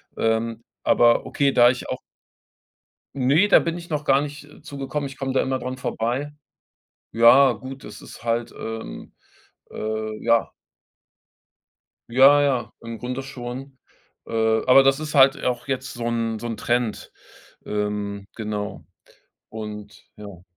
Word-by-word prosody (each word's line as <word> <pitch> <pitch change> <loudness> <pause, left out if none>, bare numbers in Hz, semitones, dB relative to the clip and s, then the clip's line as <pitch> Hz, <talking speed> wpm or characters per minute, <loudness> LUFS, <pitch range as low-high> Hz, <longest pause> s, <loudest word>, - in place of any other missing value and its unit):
ähm, 115 0 -1 0.2
aber 120 0 +4
okay, 140 -1 +1
da 120 0 +6
ich 125 - -7
auch - - -4 1.2
Ne, 145 +10 +3
da - - +7
bin 170 +1 -3
ich 170 0 -10
noch 150 -1 -2
gar 135 +1 +4
nicht, 145 0 -7
äh, 145 - -17
zu 140 - -9
gekommen, 140 +1 -3
ich 135 - -11
komme 135 -1 -3
da - - +3
immer 130 0 -1
dran 130 +1 -4
vorbei 125 +5 -3 0.8
Ja, 120 +5 +6
gut, 135 +1 -9
das 105 - -10
ist - - -12
halt, 115 0 -1
ähm, 110 0 -7 0.6
äh, 110 0 -4
ja. 115 0 +3 1.6
Ja, 135 +4 +6
ja, 130 -5 0
im 115 -1 -7
Grunde 125 +2 -5
schon, 130 +1 -8 0.5
äh, - - -11 0.3
aber 135 +1 +7
das 135 +2 +3
ist 155 -1 -5
halt 135 0 +6
auch 125 +1 -2
jetzt 135 0 -3
so 120 -1 -5
'n 115 -2 -1
so 120 - -5
'n 115 - -4
Trend. 120 -2 -1 0.5
Ähm, 105 -1 -3
genau. 105 -2 -5 0.7
Und 105 -2 -8
ja. 100 -4 -11
125 Hz, 150 wpm, -23 LUFS, 115-135 Hz, 1.6 s, da